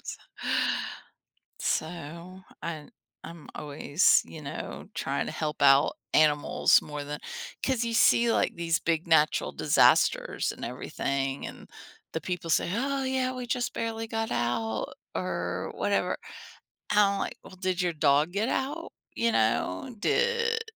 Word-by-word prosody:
S - - -6 1.4
So, 170 +3 -3 0.2
I 155 -3 -5 0.4
I'm 165 -2 -10
always, 150 +3 +3
you 160 - -10
know, 140 - -6
trying - - -1
to - - -4
help 150 -1 -3
out 140 +1 +6 0.2
animals 150 -1 +4
more 150 -1 -6
than 145 +1 -5 0.5
'cause 255 -3 +1
you 230 - -2
see, 235 +1 +5
like - - +1
these 170 -1 +1
big 165 0 -1
natural 155 -2 +3
disasters - - +3
and - - -8
everything 135 0 -3
and - - -10 0.4
the 160 - -2
people 175 +1 -4
say, 170 - +2
"Oh, 275 +4 0
yeah, 260 -1 0
we 250 -1 -5
just 245 0 -1
barely 225 0 -3
got 225 0 -2
out," 120 -2 -1 0.2
or - - -3
whatever. - - 0 0.8
I'm, 200 -1 +4
like, - - -3
"Well, - - -12
did 185 -1 -1
your 175 - +1
dog 150 +1 +3
get 215 +5 0
out? 295 +5 -2 0.2
You 230 0 +2
know, 110 - 0
did 465 - +1
170 Hz, 140 wpm, -28 LUFS, 150-230 Hz, 1.4 s, out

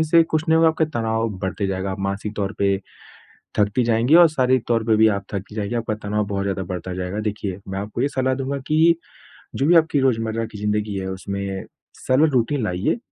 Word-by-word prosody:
इससे 165 +2 +6
कुछ 155 -1 -1
नहीं 160 - +5
होगा, 165 0 +5
आपका 160 0 +1
तनाव 115 0 0
बढ़ते 95 +1 -2
जाएगा, 95 0 -2
आप 95 - -5
मानसिक 100 +2 -3
तौर 100 -1 -2
पे 100 -1 +2 0.8
थकती 105 +4 +2
जाएँगी, 120 +5 +3
और 170 0 +8
शारीरिक 130 -5 +1
तौर 115 -2 +1
पे 110 - +4
भी 110 +1 +6
आप 100 -2 -1
थकती 100 +1 -5
जाएँगी, 105 +1 -3
आपका 115 -2 -1
तनाव 105 0 -1
बहुत 100 -1 -2
ज़्यादा 100 -1 -2
बढ़ता 90 +1 -5
जाएगा। 90 +3 -3
देखिए, 105 -3 -3
मैं 95 0 -4
आपको 105 +4 -4
ये 140 - +2
सलाह 130 -2 0
दूँगा 135 +1 -3
कि, 160 +2 +4 0.6
जो 135 - 0
भी 175 - +5
आपकी 160 -3 +3
रोजमर्रा 115 -3 0
की 110 -1 -10
ज़िंदगी 105 0 -1
है 95 - -4
उसमें 100 0 -4 0.4
सरल 145 +5 +4
रूटीन 130 +1 +1
लाइए, 90 - 0
110 Hz, 210 wpm, -22 LUFS, 100-130 Hz, 0.8 s, और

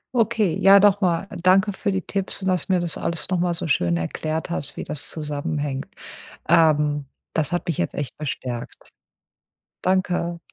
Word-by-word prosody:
Okay, 220 -6 +2
ja, 195 +1 +8
noch 205 0 +5
mal 180 -1 +1 0.2
danke 190 +3 +4
für 200 +2 -2
die 190 - 0
Tipps 195 +2 -3
und, 190 - 0
dass 180 -3 0
du 190 - +2
mir 180 - +3
das 170 -2 -2
alles 170 -1 -3
noch 185 -2 +1
mal 175 0 +1
so 165 - -3
schön 85 - +2
erklärt 155 - -3
hast, 145 -4 -4
wie - - -5
das 150 - -5
zusammenhängt. 145 -2 -3 0.6
Ähm, 150 -2 +4 0.3
das 160 0 0
hat 175 - -1
mich 170 - -1
jetzt 85 - -1
echt 145 -3 -4
bestärkt. 125 -5 -5 0.9
Danke. 180 -2 0
170 Hz, 175 wpm, -23 LUFS, 150-185 Hz, 0.9 s, ja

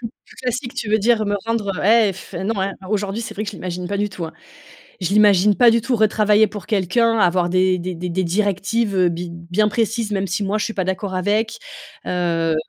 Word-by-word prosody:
Plus 230 - -5 0.3
classique 250 +1 -3
tu 235 -4 -4
veux 215 - +4
dire? 220 +1 +2
Me 205 0 0
rendre 215 -4 -2
et 220 -1 +4
f 190 - -12
heu, - - -4
non, 205 +1 -1
hein, 195 +1 -1 0.2
aujourd'hui 205 0 -1
c'est - - -6
vrai 210 - -3
que 205 - -4
je - - -11
l'imagine 180 -1 -5
pas 200 - -2
du 205 +1 0
tout, 185 -4 -6
hein. 160 - -7 0.7
Je 180 - -1
l'imagine 205 -1 +5
pas 245 -2 +6
du 230 +1 +2
tout, 240 +2 -1
retravailler 215 0 +3
pour 210 -2 -8
quelqu'un, 225 +3 +1
avoir 180 -2 +2
des 185 +1 +2
des 180 +1 -4
des 175 +2 -5
des 185 +2 -1
directives, 200 +4 0
heu, 180 -1 +4
bi 170 +1 -5
bien 175 +5 0
précises 225 0 -1
même 195 -1 -1
si 195 +3 -2
moi 200 +2 0
je 210 - -1
suis 225 - -4
pas 190 - -1
d'accord 190 +1 -3
avec, 205 - 0 0.5
heu, 170 -2 0
205 Hz, 230 wpm, -20 LUFS, 185-220 Hz, 0.7 s, pas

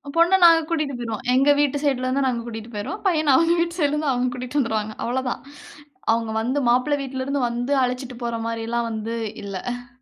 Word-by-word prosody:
பொண்ணை 340 +3 +5
நாங்க 330 -1 +8
கூட்டிட்டு 305 -5 -1
போயிருவோம். 230 -1 -5
எங்க 270 +3 +4
வீட்டு 290 -1 +2
சைடுல 260 -3 +1
இருந்து 265 +1 +1
நாங்க 240 -2 -1
கூட்டிட்டு 225 0 -7
போயிருவோம். 210 - -5
பையன் 310 -5 +3
அவங்க 335 +2 +4
வீட்டு 340 +1 -1
சைடுல 290 -1 +2
இருந்து 300 -2 0
அவுங்க 250 0 0
கூட்டிட்டு 255 +3 -2
வந்துருவாங்க. 220 -3 -1
அவ்வளோதான். 250 +1 -2 0.7
அவுங்க 225 -1 -1
வந்து 260 +5 0
மாப்பிள்ளை 255 +4 +2
வீட்டுல 260 -1 -4
இருந்து 280 -1 -1
வந்து 245 +3 -3
அழைச்சிட்டு 250 0 -3
போற 235 -1 -2
மாரிலாம் 230 +1 -2
வந்து 220 +1 -4 0.3
இல்ல. 245 +5 -5
255 Hz, 185 wpm, -23 LUFS, 235-285 Hz, 0.7 s, நாங்க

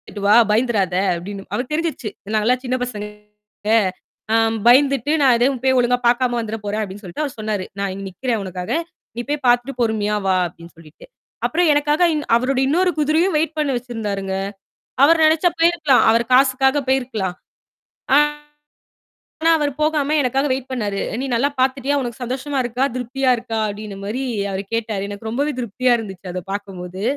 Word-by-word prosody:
"போய்ட்டு 205 - -8
வா 210 - +6 0.2
பயந்திராத" 210 -5 +1 0.2
அப்படின்னு 195 +3 -7
அவருக்கு 250 +4 -3
தெரிஞ்சிருச்சு. 310 -8 -2 0.3
நாங்க 215 -1 +1
எல்லாம் 250 +1 +2
சின்னப் 255 0 -1
பசங்க 210 -4 -6 1.3
அ - - +4 0.3
பயந்துட்டு 275 +2 +4
நான் 265 -3 +6
எதையும் 255 +2 +1
போய் 260 0 +3
ஒழுங்கா 245 0 +3
பாக்காம 245 0 +2
வந்துர 225 -1 -3
போறேன், 210 +2 -1
அப்படின்னு 200 -1 -6
சொல்லிட்டு 180 - -4
அவரு 280 -4 -3
சொன்னாரு. 215 -3 -2
"நான் 200 -1 -1
இங்க 195 +1 -7
நிக்கிறேன் 225 +4 -2
உனக்காக. 180 -1 -6 0.4
நீ 240 - -3
போய் 290 -1 -2
பாத்துட்டு 245 +3 +2
பொறுமையா 215 -2 0
வா" 190 -1 +3
அப்படின்னு 170 0 -14
சொல்லிட்டு. 155 -2 -15 0.4
அப்புறம் 345 0 +2
எனக்காக 295 +3 +2
இன் 300 -1 -2
அவருடைய 260 +2 +1
இன்னொரு 360 +4 +2
குதிரையும் 315 +4 +2
வெயிட் 315 0 -1
பண்ண 300 -2 +1
வச்சிருந்தாருங்க. 210 -6 -4 0.7
அவரு 330 +4 +6
நெனச்சா 320 +3 +4
போயிருக்கலாம். 330 -6 +4
அவரு 230 +1 +3
காசுக்காக 265 +1 +4
போயிருக்கலாம். 240 -9 -1 0.8
ஆனா, 295 0 -1 1.0
அவரு 295 -2 0
போகாம 305 -1 +1
எனக்காக 270 +2 0
வெயிட் 260 0 -5
பண்ணாரு. 205 -6 -2
அ, - - -2
"நீ - - -2
நல்லா 265 +5 +2
பாத்துட்டியா? 270 +2 +1
உனக்குச் 240 0 -5
சந்தோஷமா 265 +3 -3
இருக்கா? 245 +3 0
திருப்தியா 255 +1 0
இருக்கா?" 225 -1 -4
அப்படின்ன 205 -1 -7
மாரி 235 +6 -3 0.3
அவரு 195 +1 -3
கேட்டாரு. 215 -3 -2
எனக்கு 205 +2 -6
ரொம்பவே 285 +6 -1
திருப்தியா 245 +2 +1
இருந்துச்சு 190 -4 -8
அத 180 -1 -4
பாக்கும்போது. 190 -2 -6
245 Hz, 165 wpm, -20 LUFS, 210-280 Hz, 1.3 s, வா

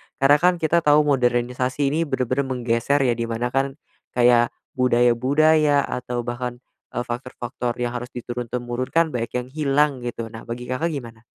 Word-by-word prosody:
Karena 145 +2 +4
kan 180 +2 +4
kita 170 0 +2
tau 150 -1 +4
modernisasi 125 0 +1
ini 165 +1 0
bener-bener 130 0 -1
menggeser 125 +2 +1
ya 125 - +3
di 115 0 -2
mana 115 +2 -2
kan, 135 +1 0 0.4
kayak 120 -1 +5 0.3
budaya-budaya 140 +5 +3
atau 125 -1 -3
bahkan, 120 0 -4 0.3
eee, - - -3
faktor-faktor 120 0 -4
yang 120 0 -2
harus 125 +1 -5
diturun-temurunkan 120 +5 -2
banyak 115 -1 -3
yang 125 - -7
hilang 145 +1 +2
gitu, 115 -1 -4
nah 115 0 -10
bagi 120 +1 -6
Kakak 145 +7 -1
gimana? 115 -5 -7
125 Hz, 155 wpm, -23 LUFS, 120-140 Hz, 0.4 s, kayak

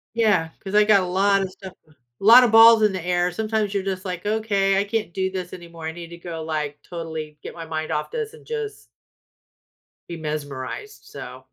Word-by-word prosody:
Yeah, 205 -8 +2
'cause 195 +1 -6
I 210 0 +6
got 205 -3 +5
a - - -3
lot 195 +2 +2
of 190 - -3
stuff 190 -1 -11
uh, - - -22 0.3
a - - -5
lot 245 +3 +9
of 225 - +1
balls 225 0 +8
in 210 -2 +4
the 185 -3 -4
air, 175 0 0
sometimes 215 0 -1
you're 200 -1 -1
just 190 0 -4
like, 180 +1 -5
"Okay, 200 -3 +1
I 200 - +2
can't 210 -4 -3
do 190 0 -1
this 185 -2 -5
anymore, 170 -2 -10
I 160 - -3
need 170 0 -9
to 170 0 -11
go, 165 -2 -6
like, 150 -2 -3
totally 160 -3 -7
get - - -8
my 165 -1 -7
mind 155 -1 -4
off 150 - -2
this 455 -1 -4
and - - -15
just" 445 -2 -5 1.2
"be 170 - -4
mesmerized," 150 - -6
so - - -10
190 Hz, 220 wpm, -23 LUFS, 165-210 Hz, 1.2 s, lot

